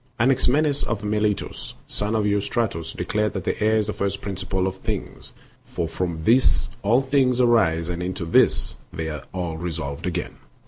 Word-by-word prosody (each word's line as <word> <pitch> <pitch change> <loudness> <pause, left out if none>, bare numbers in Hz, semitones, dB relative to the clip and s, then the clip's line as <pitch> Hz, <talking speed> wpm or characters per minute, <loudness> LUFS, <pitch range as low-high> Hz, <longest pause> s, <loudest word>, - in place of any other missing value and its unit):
Anaximenes 135 +4 +3
of 105 -2 -2
Miletos, 105 0 -1
son 105 +2 -1
of 110 - +2
Ku 105 - +2
rystratos, 100 -5 -1
declared 105 0 0
that 95 +1 -2
air 110 +1 +4
is 105 - +2
the 105 - -3
first 100 0 -1
principle 95 -1 -2
of 95 0 -1
things, 95 - -4 0.3
for 85 - -3
from 80 -1 -3
this 120 +2 +4
all 120 +6 +3
things 130 -2 +2
arise 95 -10 +3
and 90 0 -3
into 90 -1 -3
this 80 - +3
they 80 0 -4
are 75 -4 -6
all 85 -3 -3
resolved 80 -3 -4
again. 85 -1 -3
100 Hz, 170 wpm, -24 LUFS, 85-110 Hz, 0.3 s, air